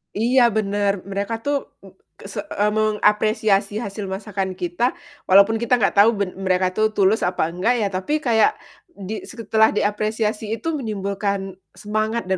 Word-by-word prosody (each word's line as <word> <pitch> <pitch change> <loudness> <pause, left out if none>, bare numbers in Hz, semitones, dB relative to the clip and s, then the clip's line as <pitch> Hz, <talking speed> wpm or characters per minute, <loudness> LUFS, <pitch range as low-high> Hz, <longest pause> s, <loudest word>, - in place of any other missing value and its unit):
Iya, 245 +4 +3
bener, 200 -2 0
mereka 200 +3 -3
tuh 285 +1 -2
m 195 - -14 0.2
kese 205 +1 -8
eee, 205 +1 0
mengapresiasi 215 -1 +1
hasil 200 -2 -5
masakan 190 -1 -4
kita 180 +8 -1 0.3
walaupun 200 +4 +5
kita 235 +2 -1
gak 195 - +1
tau 220 +3 +6
ben 200 -3 -2 0.2
mereka 185 0 +2
tuh 215 +3 0
tulus 200 0 +2
apa 180 -2 0
enggak 185 +8 0
ya, 200 - 0
tapi 205 +12 -2
kayak 240 - +3 0.4
di 200 +2 -7
setelah 220 -2 +1
diapresiasi 215 +1 -1
itu 230 +9 -3
menimbulkan 200 -4 -3 0.2
semangat 215 -1 -2
dan 190 - +1
210 Hz, 150 wpm, -21 LUFS, 195-220 Hz, 0.4 s, tau